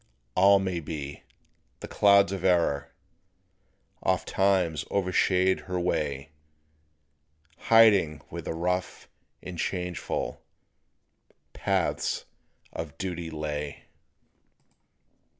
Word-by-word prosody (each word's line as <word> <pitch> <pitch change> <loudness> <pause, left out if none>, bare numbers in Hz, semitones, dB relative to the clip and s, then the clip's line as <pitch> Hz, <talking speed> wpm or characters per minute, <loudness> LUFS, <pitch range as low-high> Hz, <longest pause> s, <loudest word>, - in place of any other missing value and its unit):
All 100 +2 +6
may 95 -3 -2
be; 75 -3 -6 0.6
the - - -6
clouds 100 -2 +4
of 95 -2 -4
error 85 -7 +2 1.1
Ofttimes 95 -6 +1
overshade 95 -1 +1
her 90 -1 -2
way, 75 -4 -2 1.4
Hiding 100 -10 +5
where 85 - -6
the 80 - -5
rough 90 +2 -2 0.4
and 90 -2 -7
changeful 90 -2 -3 1.1
Paths - - -1 0.5
of 80 -3 -6
duty 85 -3 -4
lay. 75 -2 -5
90 Hz, 80 wpm, -27 LUFS, 80-95 Hz, 1.4 s, All